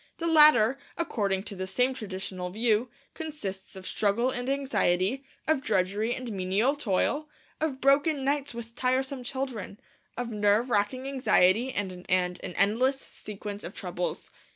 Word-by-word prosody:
The 335 - -4
latter, 300 -6 +6 0.2
according 200 - -1
to 205 - -7
the 185 0 -4
same 250 +7 +1
traditional 190 -4 -5
view, 225 +4 +1 0.2
consists 205 -14 -6
of 190 -1 -9
struggle 220 +7 +1
and 245 +1 -3
anxiety, 265 -4 +1 0.2
of 315 -3 +2
drudgery 210 -1 0
and 255 -3 -5
menial 195 +7 +1
toil, 290 +4 0 0.3
of 305 -4 -1
broken 280 +1 +3
nights 280 -2 0
with 230 0 -8
tiresome 260 +1 0
children, 245 -6 -4 0.4
of 240 -1 -3
nerve 210 +3 +2
racking 240 +5 0
anxiety 250 -3 +3
and 200 -5 -2
an 180 0 -11 0.3
endless 225 +9 +1
sequence 205 -3 -8
of 175 - -7
troubles. 180 -1 -4
235 Hz, 140 wpm, -28 LUFS, 200-270 Hz, 0.4 s, latter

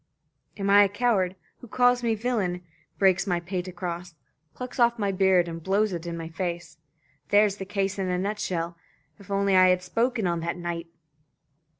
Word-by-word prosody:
Am 195 -1 -2
I 200 +1 +7
a - - -1
coward? 205 -4 +1 0.2
Who 245 - -12
calls 245 +2 +3
me 230 -2 +1
villain? 205 -6 -2 0.3
Breaks 190 -1 +3
my 175 -2 +1
pate 180 +1 -4
across? 175 -1 -6 0.4
Plucks 250 +1 -7
off 235 0 +4
my 200 -3 0
beard, 190 -2 +3
and 165 0 -6
blows 195 +3 +1
it 170 0 -5
in 170 0 -4
my 165 -1 -5
face? 170 -1 -5 0.5
There's 205 -1 +4
the 190 - -6
case 195 0 -2
in 190 - -1
a 180 - 0
nutshell. 180 -4 -3 0.4
If 200 0 -16
only 200 -1 +2
I 185 0 +7
had 180 0 +2
spoken 230 +3 0
on 170 -1 0
that 170 +2 -3
night!" 170 -1 -4
190 Hz, 185 wpm, -26 LUFS, 175-205 Hz, 0.5 s, I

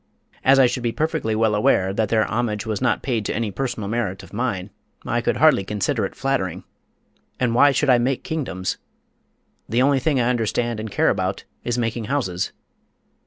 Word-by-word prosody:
As 135 +1 +6
I 135 - +7
should 125 +1 -1
be 120 -1 0
perfectly 155 -6 -1
well 110 -1 +2
aware 95 -2 +2
that 110 0 0
their 110 -1 +3
homage 110 -3 -2
was 110 0 -3
not 130 - +1
paid 120 -5 -1
to - - -2
any 110 -1 -1
personal 120 -1 -3
merit 105 -4 -2
of - - -15
mine, 105 -4 -2 0.3
I 120 - 0
could - - 0
hardly 155 -8 +5
consider 105 +3 -1
it - - -18
flattering. 110 -11 -1 0.8
And 125 -2 +1
why 145 +4 +6
should 135 +1 +2
I 125 - +5
make 125 +2 0
kingdoms? 125 - -3 0.9
The 120 +4 +2
only 140 0 +3
thing 140 0 +1
I 120 - +2
understand 120 -1 0
and 110 0 -5
care - - +2
about - - -1 0.2
is 120 0 -1
making 115 -1 -2
houses. 95 -10 -1
115 Hz, 190 wpm, -22 LUFS, 105-130 Hz, 0.9 s, I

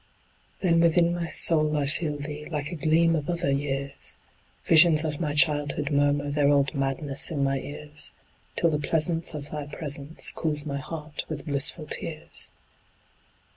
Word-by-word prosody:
Then 170 -3 +3
within 170 +1 +3
my 175 -1 -2
soul 155 -2 +3
I 145 - +1
feel 150 +1 -1
thee 150 +1 -6
Like 150 -2 -3
a - - -4
gleam 165 +1 +3
of 150 -1 -3
other 170 -4 0
years, 140 0 -2 0.5
Visions 160 -1 +6
of 150 -2 -3
my 150 -4 -2
childhood 145 -1 +2
murmur 145 0 +1
Their 145 -1 +2
old 140 0 +2
madness 135 0 -1
in 145 -4 -1
my 135 0 +1
ears, 150 +2 -5 0.4
Till 170 - +2
the 150 - 0
pleasance 165 +1 +1
of 145 -1 -7
thy 150 -2 -5
presence 145 0 -1
Cools 150 -2 -1
my 140 -2 -3
heart 150 +1 -6
with 150 -3 -6
blissful 145 +3 0
tears. 155 +1 -2
150 Hz, 160 wpm, -26 LUFS, 145-160 Hz, 0.5 s, Visions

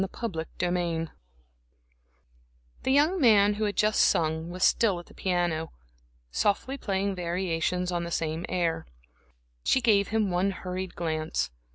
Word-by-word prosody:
Chapter 165 -9 -3 0.2
III 170 -2 -1 1.7
The 260 - 0
young 310 +6 +3
man 210 -4 +6
who 215 +1 -1
had 205 - -2
just 215 0 +2
sung 160 +1 +2
was 180 +1 -3
still 205 -6 +3
at 175 - -11
the - - -18
piano, 175 -3 -1 0.6
softly 210 - 0
playing 200 -5 -1
variations 180 0 -1
on 175 -1 -1
the 170 - -4
same 165 0 -2
air. 170 - -1 0.8
She - - +3
gave 210 -5 +3
him 220 -3 0
one 180 +3 +1
hurried 185 -1 -5
glance. 160 - -2
180 Hz, 140 wpm, -28 LUFS, 170-205 Hz, 1.7 s, man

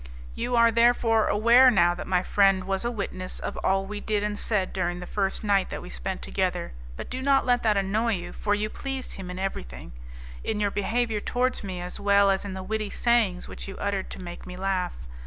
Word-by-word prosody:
You 245 +1 -2
are 230 0 +5
therefore 230 -1 +3
aware 235 +5 +6
now 175 -7 +4
that 175 - -7
my 180 -1 +1
friend 195 -2 +3
was 195 +2 -2
a 235 - 0
witness 190 -5 -5
of - - -4
all 195 0 +1
we 205 +1 -5
did 210 -1 -1
and 210 0 -2
said 200 -4 -1
during 175 -1 -1
the 180 - -7
first 195 +2 -1
night 200 -2 +2
that - - -5
we - - -9
spent - - -4
together, 60 -1 -1 0.2
but - - -6
do 255 +1 -3
not 275 0 +3
let 245 -1 +3
that 215 -2 +2
annoy 215 +4 +1
you, 175 - -7
for 205 -1 0
you 210 +1 -1
pleased 270 +3 -5
him 190 -2 -7
in 180 - -6
everything, 65 - -5 0.5
in 215 -1 -2
your 205 -1 +1
behaviour 220 +2 0
towards 250 +4 -1
me 185 -2 -5
as 180 0 -6
well 200 0 +4
as 190 - 0
in 200 -2 -5
the 190 - -6
witty 215 +1 -2
sayings 225 -7 +1
which - - -8
you 195 - -8
uttered 200 -1 -2
to - - -8
make 175 -1 -8
me 180 0 -8
laugh. 185 -2 -1
200 Hz, 225 wpm, -26 LUFS, 185-225 Hz, 0.5 s, aware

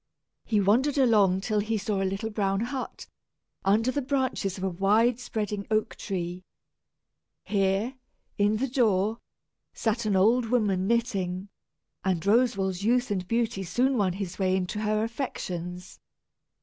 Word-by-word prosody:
He 215 - +1
wandered 245 +9 +3
along 205 -8 +4
till 210 +1 0
he 220 +2 -1
saw 200 -1 -1
a 190 - +1
little 210 +4 -3
brown 195 -1 0
hut, 255 +2 -4 0.6
under 220 +6 +3
the 285 - -1
branches 260 -8 -1
of 190 - -6
a 190 - +1
wide 215 +7 +3
spreading 210 -4 -3
oak 215 0 0
tree. 180 -2 -4 1.0
Here, 200 +4 0 0.4
in 205 +1 +2
the 265 +5 0
door, 220 -4 +1 0.6
sat 225 0 -1
an 205 - +2
old 225 +5 +4
woman 205 -6 +1
knitting, 200 -5 -1 0.5
and 185 -2 +1
Roswal's 200 -4 +2
youth 245 +1 +2
and 185 -3 -2
beauty 230 -3 0
soon 245 +9 +1
won 195 -6 +1
his 185 -1 -5
way 185 -1 +2
into 190 +3 -2
her 215 0 +1
affections. 180 -7 -5
210 Hz, 145 wpm, -27 LUFS, 190-235 Hz, 1.0 s, along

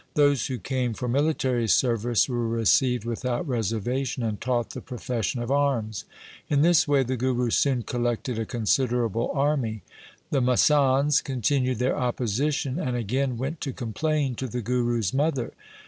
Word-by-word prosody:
Those 145 -5 +3
who 130 - -3
came 125 -3 -2
for 125 - -4
military 130 -3 +1
service 120 0 +2
were 120 -3 -1
received 115 +1 +2
without 120 +5 -2
reservation, 120 +2 -2
and 110 -2 -3
taught 120 -1 -1
the - - -7
profession 120 -2 -3
of 120 - -4
arms. 130 -7 0 0.4
In 145 -1 +3
this 170 -2 +4
way 140 -2 +3
the 130 +1 -2
Guru 125 -1 0
soon 130 -2 +2
collected 120 +1 -2
a 110 - -2
considerable 120 -1 0
army. 135 -7 0 0.5
The 140 -3 +2
masands 135 +2 +3
continued 130 0 0
their 125 +3 +1
opposition 130 - -1
and 125 -7 -1
again 125 +3 -1
went 140 +6 -4
to 135 -3 -3
complain 140 +4 -1
to 130 - -3
the 125 0 -4
Guru's 120 -4 0
mother. 140 -3 0
125 Hz, 150 wpm, -25 LUFS, 115-135 Hz, 0.5 s, this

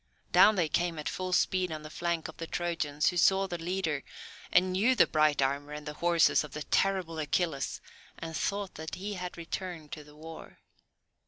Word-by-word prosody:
Down 215 - +7
they 175 -4 +2
came 170 +1 0
at 150 - -4
full 185 0 -3
speed 185 -1 +2
on 155 -1 -5
the 155 - -9
flank 170 -1 -2
of 160 - -11
the 165 - -5
Trojans, 165 -4 0
who 175 - -4
saw 190 +3 +4
the 175 -3 -5
leader, 165 -4 -2 0.5
and 185 +1 +4
knew 215 +8 +3
the - - +6
bright 155 -3 +2
armour 140 +2 -2
and 150 0 -7
the 150 - -5
horses 170 0 +3
of 150 - -10
the 150 - -4
terrible 185 -4 0
Achilles, 150 -1 -1 0.4
and 165 -1 -6
thought 200 +3 -2
that 160 +1 -6
he 200 +3 -5
had 180 -2 -6
returned 170 -2 -6
to 150 - -7
the 150 0 -17
war. 160 +1 -11
165 Hz, 195 wpm, -30 LUFS, 150-185 Hz, 0.5 s, Down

